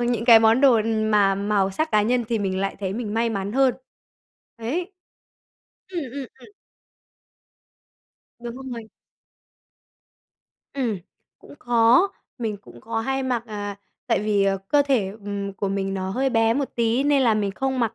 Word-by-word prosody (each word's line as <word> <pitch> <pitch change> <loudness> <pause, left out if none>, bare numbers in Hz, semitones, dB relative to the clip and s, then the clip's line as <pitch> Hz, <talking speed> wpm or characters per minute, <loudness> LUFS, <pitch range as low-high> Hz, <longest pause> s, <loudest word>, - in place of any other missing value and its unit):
những 240 -2 0
cái 230 -2 +9
món 225 +3 +4
đồ 255 -5 +5
mà 215 -3 +2
màu 200 -1 0
sắc 315 +11 -1
cá 210 -1 +4
nhân 240 +2 +1
thì 230 -2 0
mình 190 -2 -1
lại 195 0 -2
thấy 190 -1 -2
mình 220 -1 -4
may 230 +1 +1
mắn 200 -1 -3
hơn. 265 -1 +3 0.8
Ấy. 335 - -3 1.0
Ừm, 360 -3 -4
ừm, 275 -2 -5
ừm. - - -14 1.9
Đúng 245 +2 -7
rồi. 230 -2 -7 1.8
Ừm, 240 -8 -2 0.4
cũng - - -15
có, 240 +9 +4 0.3
mình 220 -3 -2
cũng 200 - -16
có 225 0 -3
hay 270 +3 -1
mặc, 250 -3 -1
à, 205 -2 -5 0.3
tại 230 -4 +1
vì, 210 -2 +1
à, 195 0 +2
cơ 290 -1 +4
thể, 260 -9 +1 0.2
ừm, 200 -1 -4
của 195 0 -3
mình 195 0 -2
nó 190 0 -3
hơi 265 +5 0
bé 225 -1 +3
một 280 -1 -1
tí 235 +2 +1
nên 285 -2 +3
là 230 -4 +4
mình 205 -2 0
không 265 +5 -2
mặc, 230 -1 0
225 Hz, 165 wpm, -23 LUFS, 205-255 Hz, 1.9 s, cái